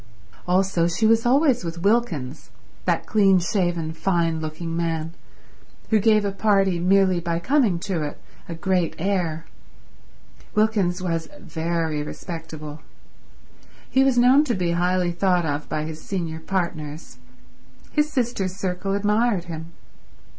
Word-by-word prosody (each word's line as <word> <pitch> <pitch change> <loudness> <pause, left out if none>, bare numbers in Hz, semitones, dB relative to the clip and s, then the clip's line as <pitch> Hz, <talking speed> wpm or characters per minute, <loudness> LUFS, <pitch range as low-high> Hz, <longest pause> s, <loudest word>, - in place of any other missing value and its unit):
Also 180 -2 +2
she 175 +6 0
was 225 +1 +4
always 265 - +3
with 170 0 -5
Wilkins, 185 - 0 0.4
that - - 0
clean 195 -3 +4
shaven, 175 -3 -1
fine 165 -2 0
looking 160 +1 -5
man, 165 -1 -2 0.8
who 220 - +5
gave 215 0 +3
a 200 - 0
party, 195 -3 +2
merely 185 0 +3
by 170 -1 -2
coming 225 - +2
to 180 -4 -2
it, 150 -1 -5 0.3
a 170 - -4
great 180 0 0
air. 170 -3 -1 1.1
Wilkins 200 -4 +1
was 165 -2 -2
very 160 -2 -2
respectable. 155 -2 -7 1.1
He 265 - +4
was 265 -2 +2
known 255 +4 +6
to 240 -5 0
be 180 -2 0
highly 180 +1 +1
thought 180 0 +1
of 145 -1 -3
by 155 0 -2
his 155 0 -6
senior 170 -5 -4
partners. 160 -6 -4 0.7
His 300 0 +1
sister's 235 -9 -1
circle 195 0 -2
admired 210 -1 +1
him. 165 -1 -7
180 Hz, 130 wpm, -23 LUFS, 165-200 Hz, 1.1 s, known